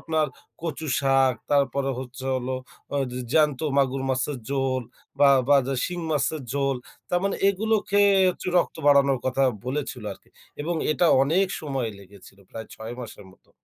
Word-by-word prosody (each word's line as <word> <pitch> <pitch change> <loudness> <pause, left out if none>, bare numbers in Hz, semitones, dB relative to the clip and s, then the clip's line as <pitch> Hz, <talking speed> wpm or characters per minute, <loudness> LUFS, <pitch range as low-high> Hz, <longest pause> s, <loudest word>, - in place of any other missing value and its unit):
আপনার 160 -1 0 0.4
কচু 160 -1 -4
শাক, 135 -2 +3 0.2
তারপরে 140 -1 +2
হচ্ছে 130 +1 -8
হলো 130 0 -2 0.4
আ - - +1
জ - - -10 0.2
জ্যান্ত 150 -4 +3 0.2
মাগুর 135 -1 +2
মাছের 130 +2 -1
ঝোল 135 -2 0 0.4
বা 140 -1 +7 0.2
বা, 145 - +7
যে 135 - -1
শিং 175 0 -4
মাছের 150 +1 0
ঝোল, 140 -1 0 0.3
তার 175 0 +1
মানে 200 - 0
এগুলো 220 +3 +1
খেয়ে 200 0 +4 0.2
হচ্ছে 180 - -9
রক্ত - - -1
বাড়ানোর 140 -2 +5
কথা 130 +1 +1 0.2
বলেছিলো 130 -4 -3
আরকি - - -17 0.3
এবং 170 +4 -2 0.2
এটা 175 - +2 0.2
অনেক 170 +8 +2
সময় 135 -6 -2
লেগেছিল 100 0 -16
প্রায় 110 0 -7
৬ 110 +2 -7
মাসের 105 -4 -9
মতো। - - -27
140 Hz, 165 wpm, -25 LUFS, 130-155 Hz, 0.4 s, বা